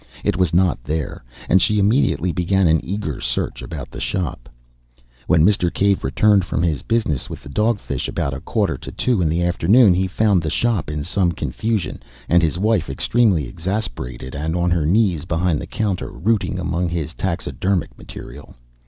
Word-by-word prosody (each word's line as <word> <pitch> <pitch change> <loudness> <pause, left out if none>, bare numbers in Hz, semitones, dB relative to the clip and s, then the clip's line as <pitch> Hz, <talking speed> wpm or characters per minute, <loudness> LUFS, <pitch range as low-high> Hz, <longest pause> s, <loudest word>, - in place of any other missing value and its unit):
It - - +1
was 90 -1 +1
not 90 -7 +2
there; 75 -3 -3 0.2
and 95 - +4
she 105 -3 +2
immediately 105 -3 +2
began 95 +2 +1
an 80 -1 +3
eager 100 +3 -4
search - - -2
about 70 -6 -7
the - - -7
shop. 75 -9 -3 0.8
When 80 -1 +4
Mr. 95 -4 +2
Cave 100 -1 +1
returned 100 +8 +3
from 85 -1 -2
his 80 -5 0
business 110 - -1
with - - -8
the - - -10
dog 105 +7 +1
fish, - - -4
about 70 - -2
a 70 - -5
quarter - - -1
to - - -8
two 120 -7 0
in 80 - +2
the 85 +2 0
afternoon, 90 +5 +5
he 95 +1 +1
found 100 -1 +2
the 80 - -2
shop 110 +1 0
in 75 -1 -3
some 90 +1 +1
confusion, 90 - -2 0.3
and 85 0 +4
his 80 0 0
wife, 100 -5 +1
extremely 95 - +2
exasperated 65 - -4
and 80 +3 -2
on 85 0 +1
her 85 -4 +1
knees 90 -4 +2
behind 85 -2 0
the - - -7
counter, 100 -4 -2
routing 100 -1 0
among 90 -1 -1
his 85 -2 -3
taxidermic 95 +1 -2
material. - - -11
90 Hz, 180 wpm, -20 LUFS, 80-100 Hz, 0.8 s, afternoon